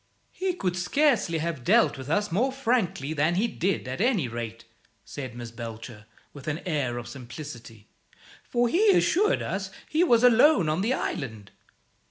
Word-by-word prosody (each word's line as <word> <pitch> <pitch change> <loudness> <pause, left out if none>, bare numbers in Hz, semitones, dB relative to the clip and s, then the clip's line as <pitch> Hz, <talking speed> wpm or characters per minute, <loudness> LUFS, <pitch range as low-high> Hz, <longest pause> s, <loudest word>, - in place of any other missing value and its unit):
"He 370 -1 -2
could 180 - -2
scarcely 220 - +2
have 160 -5 -3
dealt 225 - +4
with 135 0 -8
us 205 +4 0
more 240 +10 +1
frankly 230 - -1
than 155 +3 +1
he 210 +6 +2
did, 190 - -2
at 125 +8 -4
any 220 - +2
rate," 115 -1 -6 0.4
said 130 -4 -7
Miss 120 -1 -7
Belcher, 115 -2 -9 0.3
with 140 -1 -11
an 155 +2 -2
air 140 -8 -1
of 120 - -6
simplicity; 120 -4 -10 0.6
"for 240 0 +1
he 395 - +3
assured 420 +6 +2
us 190 0 -3 0.2
he 320 +3 +2
was 240 -9 +4
alone 245 - +5
on 155 +4 0
the 225 +5 0
island." 110 - -4
165 Hz, 165 wpm, -26 LUFS, -, 0.6 s, alone